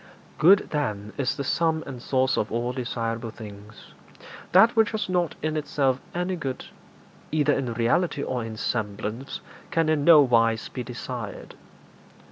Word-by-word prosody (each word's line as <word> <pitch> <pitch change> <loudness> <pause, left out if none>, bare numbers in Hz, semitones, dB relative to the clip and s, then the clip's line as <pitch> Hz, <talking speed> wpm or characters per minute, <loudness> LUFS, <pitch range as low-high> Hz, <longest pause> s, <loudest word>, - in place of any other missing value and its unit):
Good, 190 +6 +6
then, 105 -8 -2
is 130 -3 -1
the 140 - -2
sum 160 +3 +1
and 130 -3 -8
source 130 0 +1
of 105 - -1
all 120 +2 -1
desirable 115 -2 -3
things. 105 -1 -12 0.6
That 225 +7 +6
which 225 -2 +4
has 215 -1 -1
not 180 -3 0
in 155 0 -1
itself 135 -3 0
any 180 +1 -1
good, 135 -7 -5 0.7
either 150 -2 +3
in 130 -4 -2
reality 140 +6 +1
or 125 -2 -2
in 110 -1 -6
semblance, 110 +4 -3 0.3
can 165 -1 +1
in 155 -2 +2
no 165 -1 +8
wise 115 -4 +2
be 130 - -5
desired. 120 -2 -7
130 Hz, 150 wpm, -25 LUFS, 115-155 Hz, 0.7 s, no